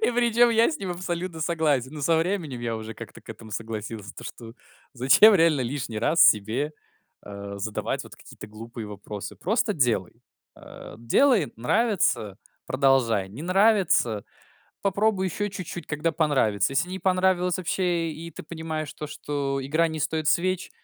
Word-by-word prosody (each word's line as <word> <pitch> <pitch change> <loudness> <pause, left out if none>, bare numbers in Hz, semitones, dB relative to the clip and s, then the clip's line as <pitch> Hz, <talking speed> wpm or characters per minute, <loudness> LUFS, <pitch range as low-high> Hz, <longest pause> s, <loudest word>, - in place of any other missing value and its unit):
И - - +3
причем 240 0 +4
я 230 +5 +4
с 315 - -4
ним 190 -2 -4
абсолютно 175 -1 -4
согласен. 155 -5 0
Ну 150 - -7
со 165 +3 +3
временем 165 -7 -1
я 115 -1 -2
уже 110 0 -7
как-то - - -10
к - - -23
этому 110 - -10
согласился. 110 -1 -6
То - - -10
что, 115 -1 -9 0.4
зачем 135 - +6
реально 165 -5 +4
лишний 125 -3 -4
раз 160 +8 +2
себе, 115 +9 +3 0.5
а, 100 0 -8
задавать 105 +1 -3
вот - - -12
какие-то - - -12
глупые 115 +1 -9
вопросы? 105 0 -8
Просто 220 +3 0
делай. 120 - 0 0.3
А, - - -12
делай, 195 - +3
нравится- 125 - +1 0.3
продолжай, 130 -7 +2
не 110 +10 -9
нравится- 185 - +3 0.6
попробуй 200 0 +1
ещё 205 +4 -2
чуть-чуть, 185 -3 -7
когда 150 +2 -1
понравится. 135 - +1
Если 155 +6 +1
не 190 - -4
понравилось 185 -1 +2
вообще 175 -2 0
и 165 +2 -8
ты - - -9
понимаешь 160 -2 -5
то, 150 - -6
что 140 -2 -3
игра 160 +5 +2
не 160 -1 -5
стоит 155 0 -1
свеч,- 185 +5 +1
155 Hz, 160 wpm, -25 LUFS, 115-185 Hz, 0.6 s, зачем